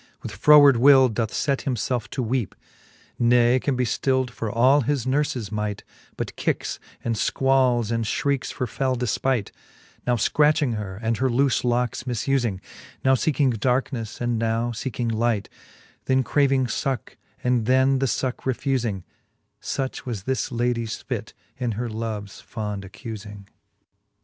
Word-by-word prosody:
With - - -5
froward 145 -4 +7
will 130 +1 +7
doth 115 +4 -2
let 140 -1 +2
himlelfe 125 -2 -2
to 130 - -3
weepe 120 -3 -2
j - - -42 0.7
Ne 120 +1 +4
can 140 +1 -1
be 125 0 +1
ftild 130 +1 0
for 115 -2 -4
all 130 +6 +4
his 135 -1 -1
nurles 130 -5 -1
might, 105 -1 -3 0.3
But - - -4
kicks, - - -2 0.2
and 115 - 0
Iquals, 125 -1 +2
and 115 0 0
fhriekes 135 +3 -1
for 125 - -3
fell 130 +3 -1
delpightj 125 -1 -1 0.6
Now 125 - +3
Icratching 150 +2 +2
her, 100 -3 -5
and 115 0 0
her 130 0 +1
loole 135 +3 +2
locks 120 +1 0
mufuling 120 -3 0
j - - -17 0.4
Now 130 - +5
feeking 135 -1 +2
darkenefle, 125 -2 -1
and 120 -2 0
now 115 +1 0
leeking 120 0 -3
light 110 -2 0 0.3
,* - - -29
Then 130 0 +2
craving 135 0 +2
fucke, 125 +2 -3 0.3
and 125 -3 +1
then 130 +1 +4
the 135 - +1
fucke 125 +2 -2
refufing: 120 -8 -1 0.6
Such 135 -1 -3
was 110 -6 -4
this 130 +2 -2
ladies 120 -2 -1
fit, - - -5 0.2
in 120 -3 -1
her 120 +4 -3
loves 110 -2 -5
fond 105 -2 -5
accufing. 105 -4 -8
125 Hz, 155 wpm, -24 LUFS, 115-130 Hz, 0.7 s, froward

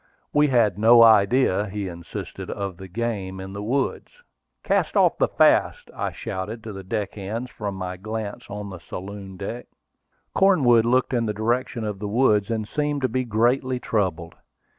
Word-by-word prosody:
We 150 0 +4
had 115 -7 +2
no 115 +2 +7
idea, 105 -1 +4
he 100 0 -4
insisted, 85 -2 -7
of 100 -3 -4
the 95 - -9
game 95 -2 -3
in 95 +1 -7
the 100 - -5
woods. 130 +6 -2 0.4
"Cast - - +1
off - - +3
the - - +4
fasts!" - - +2
I - - -2
shouted 105 +5 -5
to 110 -2 -7
the 95 0 -8
deckhands, 105 +3 -4
from 100 -3 -5
my 90 -1 -5
place 110 +1 -6
on 105 -1 -6
the 90 - -8
saloon 95 +2 -8
deck. 115 +6 -6 0.7
Cornwood 130 - +4
looked 130 +2 +2
in 120 -2 +1
the 105 - -2
direction 120 +2 -1
of 105 -2 -4
the 105 - -4
woods, 105 -2 +2
and 110 -2 -2
seemed 145 +2 -2
to 130 - +2
be 130 +3 -1
greatly 125 +3 +1
troubled. 90 -8 -2
110 Hz, 170 wpm, -24 LUFS, 100-120 Hz, 0.7 s, no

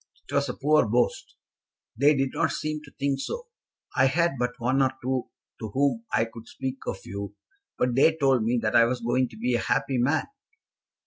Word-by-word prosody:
"It - - -10
was 140 -1 +1
a 125 - -3
poor 150 -3 +3
boast." 120 +3 0 0.6
"They 145 +5 +4
did 135 -1 0
not 160 -1 +1
seem 155 +1 -3
to 135 - -15
think 140 -1 0
so. 475 - -5 0.5
I 130 - +5
had 170 +5 +2
but 125 0 0
one 130 +3 +2
or 130 -1 +3
two 130 0 -2 0.3
to 110 - -4
whom 135 -4 +1
I 115 - +2
could 115 0 -12
speak 130 -1 -5
of 95 - -4
you, 100 +1 -6 0.4
but 125 -1 +1
they 150 +5 +4
told 135 -4 +3
me 120 +2 +1
that 110 +1 0
I 115 0 +7
was 125 +1 -1
going 120 +2 +1
to 110 - -13
be 120 +3 0
a 120 - +2
happy 130 -2 0
man. 145 +6 +2
130 Hz, 205 wpm, -26 LUFS, 120-140 Hz, 0.6 s, I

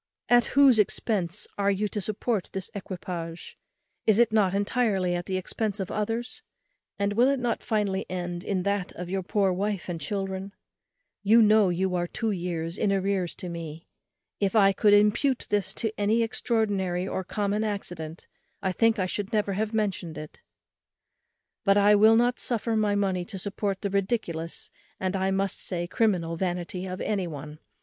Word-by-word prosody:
At 240 -1 +5
whose 270 -5 +7
expence 200 -3 0
are 200 0 +3
you 200 +1 +1
to 210 - -3
support 215 +1 -2
this 190 -1 -4
equipage? 175 -3 -6 0.5
is 215 -2 +5
it 235 -1 +4
not 195 -3 +3
entirely 200 -3 +1
at 175 0 -3
the 190 - -1
expence 210 +2 -2
of 190 - -3
others? 230 - -2 0.6
and 200 0 0
will 240 +4 +4
it 275 -1 +2
not 240 -2 -1
finally 205 -3 -1
end 175 -1 -4
in 190 -3 -1
that 200 -1 -1
of 180 0 -7
your 195 0 0
poor 195 0 +1
wife 200 0 -2
and 170 -3 -4
children? 195 +3 -3 0.7
you 215 +3 +5
know 215 -3 +5
you 180 +1 0
are 175 -1 0
two 225 +4 -2
years 170 -2 -3
in 210 - +2
arrears 195 -2 0
to 180 - -7
me. 165 -2 -7 0.5
If 200 +1 0
I 195 -2 +6
could 205 +1 +5
impute 210 +6 +3
this 205 -3 +1
to 220 -2 -1
any 215 +3 +3
extraordinary 205 -6 0
or 190 - -2
common 205 +3 -1
accident 175 -6 -5 0.3
I 190 -2 -1
think 225 +4 +3
I 185 - +1
should 200 +2 -3
never 210 -3 +1
have 210 +2 -1
mentioned 195 -7 -2
it; 155 0 -9 1.2
but 200 -1 +4
I 205 +1 +6
will 215 +2 +6
not 240 +2 +2
suffer 230 -1 -1
my 210 -2 +2
money 190 -3 0
to 195 - -7
support 195 0 -3
the 200 - -1
ridiculous, 190 -5 -2 0.3
and, 190 0 -1
I 190 0 +1
must 195 0 0
say, 175 -2 -3
criminal 175 -4 0
vanity 180 +1 -3
of 185 0 -5
any 195 -4 -1
one. 150 -1 -8
195 Hz, 175 wpm, -27 LUFS, 180-215 Hz, 1.2 s, whose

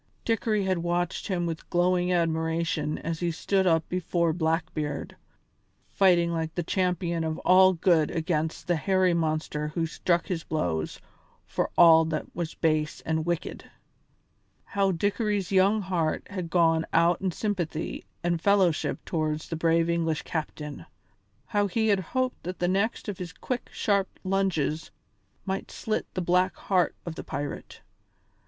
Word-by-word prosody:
Dickory 220 -2 +1
had 185 -2 0
watched 175 0 -1
him 180 -4 -1
with 165 -1 -5
glowing 180 +1 +2
admiration 160 -2 0
as 165 0 -4
he 175 - 0
stood 190 +3 +1
up 165 -2 +2
before 170 -2 0
Blackbeard, 160 -3 -2 0.8
fighting 175 -3 +4
like 160 -1 -3
the 175 - -1
champion 175 -2 0
of 160 0 -2
all 185 +1 +7
good 165 -3 +3
against 160 -1 -2
the 175 -1 +1
hairy 185 +1 +2
monster 155 -2 -1
who 165 +2 -1
struck 170 +1 0
his 170 -4 -3
blows 85 - -2 0.5
for - - -2
all 165 -1 +8
that 155 -1 -2
was 170 -1 -4
base 155 -2 0
and 160 0 -2
wicked. 175 -1 -3 0.9
How 195 -1 +1
Dickory's 205 +2 -1
young 195 +2 +4
heart 175 -4 -1
had 180 -4 -4
gone 165 -2 +3
out 170 +1 +3
in 190 - 0
sympathy 175 -4 -3 0.2
and 170 -1 0
fellowship 190 -5 +2
towards 155 -2 -2
the 165 - -2
brave 165 +1 +2
English 165 -2 0
captain! 150 -2 -5 0.6
How 205 +5 +1
he 220 +3 +1
had 200 -2 +4
hoped 255 +7 -2
that 180 +1 -5
the 175 - 0
next 200 +6 0
of 205 -3 -4
his 180 -2 -5
quick, 250 +7 -4
sharp 200 -2 +1
lunges 185 -5 0 0.6
might 195 0 -3
slit 215 -1 -3
the 185 - 0
black 180 +2 +2
heart 185 -3 +1
of 170 - -4
the - - -7
pirate! 145 0 -6
170 Hz, 150 wpm, -27 LUFS, 160-190 Hz, 0.9 s, all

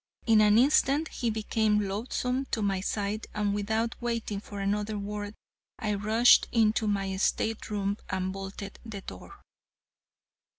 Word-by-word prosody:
In 225 -2 +5
an 210 0 +5
instant 285 +4 +3
he 235 - -2
became 215 -1 +1
loathsome 250 +6 -2
to 220 - -1
my 195 -2 +1
sight, 205 +2 -2
and 205 -1 0
without 220 +3 -1
waiting 230 -4 -2
for 205 0 -9
another 205 +2 -1
word 205 +1 -5 0.4
I 215 -1 -1
rushed 220 +4 +5
into 220 -1 +2
my 195 -2 -1
state 220 +3 0
room 200 -1 -1
and 190 0 -2
bolted 195 +1 -7
the 215 -4 -7
door. 395 - -11
210 Hz, 140 wpm, -28 LUFS, 200-225 Hz, 0.4 s, In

